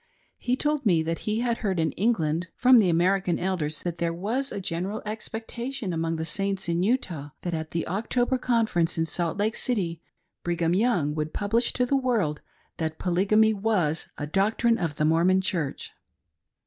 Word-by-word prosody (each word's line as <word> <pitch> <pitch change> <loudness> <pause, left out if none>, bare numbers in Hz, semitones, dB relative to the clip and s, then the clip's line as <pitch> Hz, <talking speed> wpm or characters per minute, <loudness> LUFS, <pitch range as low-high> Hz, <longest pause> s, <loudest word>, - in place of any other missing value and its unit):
He 250 - 0
told 295 +1 0
me 175 -8 +3
that 165 +1 -2
he 215 +2 0
had 235 -1 0
heard' 195 -6 -1
in 160 -2 +1
England 170 - 0
from 255 -1 +6
the 195 -5 +3
American 180 +2 +2
Elders 175 -5 -2
that 175 -1 -3
there 170 0 0
was 225 +11 -2
a - - -4
general 185 +2 -3
expectation 225 +1 -4
among 165 0 -1
the 160 0 -3
Saints 195 +3 -1
in 170 0 0
Utah 185 - -1
that 175 - -2
at 160 -1 -3
the 165 0 -3
October 245 +7 0
Conference 220 -11 +1
in 165 - +1
Salt 170 +1 -2
Lake 215 +3 0
City, 175 -9 0 0.4
Brigham 170 -1 0
Young' 185 -8 +2
would 155 0 -3
publish 225 +4 +1
to 250 - +1
the 275 - +1
world 225 - 0 0.4
that 160 -1 -3
Polygamy 205 +5 +3
was 195 -7 0
a 145 - -3
doctrine 220 - +1
of 165 -5 -2
the 150 - 0
Mormon 170 +4 +4
Church. 170 -7 -3
185 Hz, 175 wpm, -26 LUFS, 165-225 Hz, 0.4 s, from